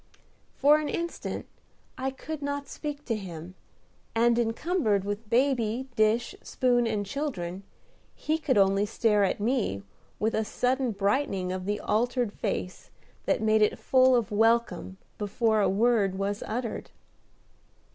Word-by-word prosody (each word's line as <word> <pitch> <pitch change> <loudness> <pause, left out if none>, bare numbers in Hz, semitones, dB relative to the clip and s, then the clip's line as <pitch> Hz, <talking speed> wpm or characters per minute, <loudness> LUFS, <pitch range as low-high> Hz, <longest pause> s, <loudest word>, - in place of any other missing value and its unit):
For 295 +2 +5
an 300 - -3
instant 340 0 -4 0.5
I 265 +1 -2
could 295 +3 -7
not 285 0 -3
speak 295 0 -6
to 230 - -1
him, 180 -4 -7 0.6
and, 235 +1 +3
encumbered 225 - +1
with 205 +2 -4
baby, 245 0 +1
dish, 220 +2 +2
spoon, 245 -2 +1
and 210 -2 -1
children, 195 - -4 0.5
he 315 +1 -1
could 265 -7 +1
only 195 +1 +3
stare 210 -2 +2
at 195 - 0
me 210 - 0 0.3
with 220 +1 0
a 220 - +1
sudden 255 +3 0
brightening 200 -2 0
of 185 0 -4
the 205 +1 -1
altered 240 0 0
face 185 - -4 0.4
that - - +1
made 220 0 +3
it 210 - +3
full 260 -1 +4
of 235 -2 0
welcome 225 -2 +1 0.2
before 220 +1 +1
a - - +3
word 205 -2 +2
was 200 +1 -2
uttered. 235 +1 -4
225 Hz, 140 wpm, -28 LUFS, 205-260 Hz, 0.6 s, For